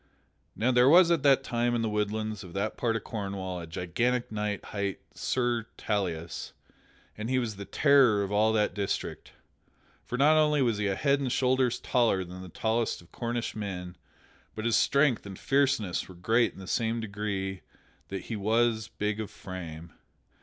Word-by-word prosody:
Now 125 +4 +2
there 125 +1 +5
was 175 +2 +7
at 165 -4 +3
that 135 -1 +4
time 120 -1 0
in 115 - 0
the - - +1
woodlands 105 0 -2
of 90 -2 -11
that 100 +2 -2
part 115 -2 0
of 115 - -3
Cornwall 95 -4 -4
a 85 - -7
gigantic 115 +10 -1
knight 105 -2 -3
hight 100 -2 -3
Sir 120 -3 -1
Tauleas, 85 -5 -3 0.6
and 110 +2 -5
he 130 - +2
was 115 -4 -1
the 100 0 -7
terror 125 -2 +4
of 100 - -4
all 105 +2 +3
that 105 -1 +1
district. 100 -2 -3 0.7
For 125 - -4
not 150 +4 +5
only 150 -1 +3
was 115 -4 +1
he 105 - 0
a 95 - 0
head 140 +5 +2
and 135 -3 -2
shoulders 130 -1 +2
taller 115 -6 +2
than 90 +1 -9
the 95 - -9
tallest 115 +5 -1
of 85 - -23
Cornish 120 -1 -3
men, 90 -4 -5 0.6
but 110 - -4
his 115 -2 +3
strength 140 +1 +3
and 95 -2 -8
fierceness 135 -12 +1
were 95 - -11
great 115 +7 +2
in - - -14
the 95 - -8
same 115 +4 0
degree 100 -3 -3 0.5
that 95 -1 -5
he 115 - -5
was 110 +1 +1
big 105 +1 -3
of 110 - -4
frame. 85 -3 -8
110 Hz, 180 wpm, -29 LUFS, 100-120 Hz, 0.7 s, was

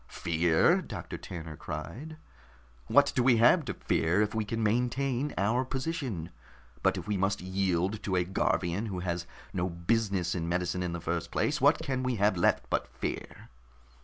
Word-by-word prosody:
"Fear?" 85 -1 +2
Doctor - - -7
Tanner 80 -3 -7
cried. 85 - -7 0.7
"What 145 0 +5
do 130 - +3
we 120 -1 +5
have 125 +9 +5
to - - -4
fear 90 +6 +1
if 105 - -2
we 110 -1 0
can 115 +2 -2
maintain 125 +5 0
our 110 +6 +2
position? 130 - -3 0.5
But - - +2
if - - -6
we 105 -1 0
must 95 +1 +1
yield 95 +2 0
to 95 - -1
a 90 - +3
Garvian 95 +2 0
who 95 -4 -4
has 85 -1 -3 0.3
no 90 0 -1
business 90 0 0
in 85 -2 -2
medicine 90 +1 -1
in 90 -1 -2
the 85 - -3
first 85 0 -2
place, - - 0
what - - +6
can 130 -2 -2
we 130 -1 0
have 105 -1 +2
left 85 - +2
but - - 0
fear?" - - -6
95 Hz, 175 wpm, -30 LUFS, 85-120 Hz, 0.7 s, what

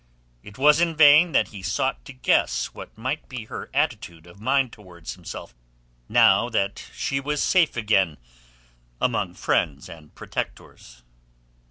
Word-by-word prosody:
It 105 +9 -13
was 150 +4 +5
in 165 -2 +1
vain 155 +3 +7
that - - +2
he 100 -3 -10
sought 95 -10 -2
to - - -9
guess 65 - +1
what - - -11
might 130 +7 -4
be 120 -4 -7
her - - -8
attitude 80 -1 -2
of 85 +4 -16
mind 130 +1 +1
towards 90 -5 -10
himself - - -9 0.6
now 100 +5 +5
that 100 -4 -1
she 135 - -1
was 145 +2 -2
safe 170 -8 +2
again 95 -8 +1 0.8
among - - -1
friends 70 -3 -1
and 80 -2 -14
protectors. - - -7
110 Hz, 145 wpm, -24 LUFS, 85-140 Hz, 0.8 s, vain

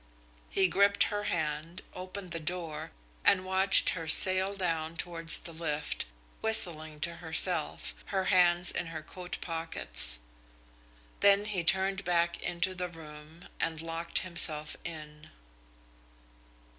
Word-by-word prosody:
He 190 -1 +1
gripped 200 +2 +1
her 205 0 -5
hand, 160 0 -5
opened 185 0 -9
the 165 - -4
door, 165 -1 -6 0.3
and 185 -2 +1
watched 190 +1 +3
her 165 -3 -7
sail 185 +4 +5
down 165 -3 -4
towards 165 -1 +6
the 170 - -9
lift, 155 - -5 0.3
whistling 160 -8 +2
to 170 +1 -3
herself, 160 - -1
her 190 - -4
hands 175 -1 +2
in 175 - -6
her 160 -1 -9
coat 180 +2 -9
pockets. 165 - +4 1.0
Then 200 0 +3
he 200 -5 -3
turned 190 +3 -1
back 170 -1 -2
into 180 +2 -3
the 180 -1 -6
room 155 0 -15
and 165 -1 -4
locked 165 +1 -4
himself 155 -3 +4
in. 155 -1 -11
170 Hz, 125 wpm, -28 LUFS, 160-185 Hz, 1.0 s, towards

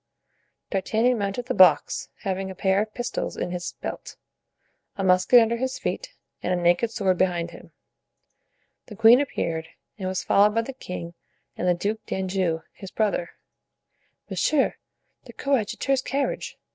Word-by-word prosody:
D'Artagnan 225 +5 +1
mounted 200 +4 -2
the 255 - -2
box, 180 -9 +4
having 190 -1 -2
a 190 - -7
pair 190 +2 +2
of 215 0 -4
pistols 245 +2 -4
in - - -3
his 175 -1 -4
belt, - - -6 0.8
a 195 - -2
musket 185 +6 +6
under 230 0 +2
his 260 +2 -2
feet - - -4 0.3
and - - -2
a - - +3
naked 175 +6 +2
sword 195 -5 0
behind 175 -2 +1
him. - - -14 1.2
The 215 - -10
queen 225 +5 +7
appeared, 165 - -3 0.3
and 190 - -3
was 185 0 -2
followed 210 +2 +4
by 230 - +2
the 270 - -7
king 180 -8 -7 0.4
and 180 - -2
the 180 - +4
Duke 210 +5 -3
d'Anjou, 185 -4 -1
his 195 - -10
brother. 200 -4 -1 1.0
"Monsieur 300 -3 +1 0.5
the - - -12
coadjutor's 270 +1 0
carriage!" 275 +1 -2
195 Hz, 150 wpm, -25 LUFS, 180-235 Hz, 1.2 s, queen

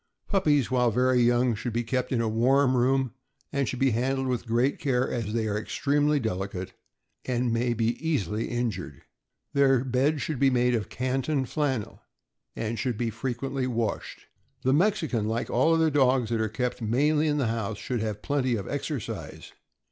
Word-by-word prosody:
Puppies 150 - +2
while 125 -1 +3
very 125 +2 +3
young 120 0 +3
should 110 +2 -4
be 120 +1 0
kept 125 +2 -2
in 120 -3 +1
a 115 - 0
warm 130 +4 +3
room, 130 0 +2 0.4
and 140 -2 0
should 130 - -3
be 135 +1 +2
handled 130 +4 0
with 125 -2 -2
great 120 +4 +1
care, 130 -2 +1
as 115 -4 -3
they 110 0 0
are 105 - -1
extremely 145 +5 +1
delicate 95 -4 -4 0.5
and 125 -2 0
may 120 +1 +1
be 115 +1 +1
easily 110 - -1
injured. 110 - -3 0.5
Their 135 -3 +4
bed 135 +4 +1
should 150 -2 -3
be 135 - +5
made 125 -1 +2
of 110 -3 -1
Canton 130 +2 -1
flannel, 130 -6 -2 0.5
and 115 +1 -3
should 125 -4 -1
be 115 -1 -1
frequently 130 +3 -3
washed. 115 -4 -3 0.4
The 130 - +3
Mexican, 160 - +1
like 115 +2 -2
all 130 +7 +3
other 160 -1 +3
dogs 130 -4 +3
that 115 -1 +1
are 110 - 0
kept 125 +3 -3
mainly 150 +8 +2
in 150 -1 +1
the 140 - +1
house, 110 -2 -2
should 125 +2 -3
have 110 -2 -3
plenty 130 -4 +1
of 100 -4 -4
exercise. - - -5
125 Hz, 180 wpm, -27 LUFS, 115-135 Hz, 0.5 s, be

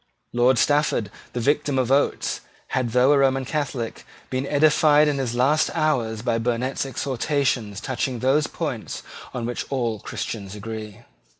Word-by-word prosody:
Lord 120 +1 +4
Stafford, 145 -8 +2 0.2
the 125 - -2
victim 145 +2 +1
of 130 -1 +1
Oates, 140 +1 +1 0.3
had, 130 -2 0
though 125 +4 +4
a 145 - +5
Roman 135 -1 +2
Catholic, 130 -5 -3 0.3
been 130 +1 -1
edified 150 0 +5
in 145 -2 0
his 125 -3 -2
last 140 +5 +3
hours 120 -9 0
by 115 -2 +1
Burnet's 125 +4 -1
exhortations 130 -5 -1
touching 130 +1 -2
those 135 +5 +2
points - - -4 0.3
on 120 -2 -4
which 120 +1 -3
all 120 -5 -1
Christians 100 0 -5
agree. 110 0 -7
130 Hz, 145 wpm, -24 LUFS, 115-140 Hz, 0.3 s, a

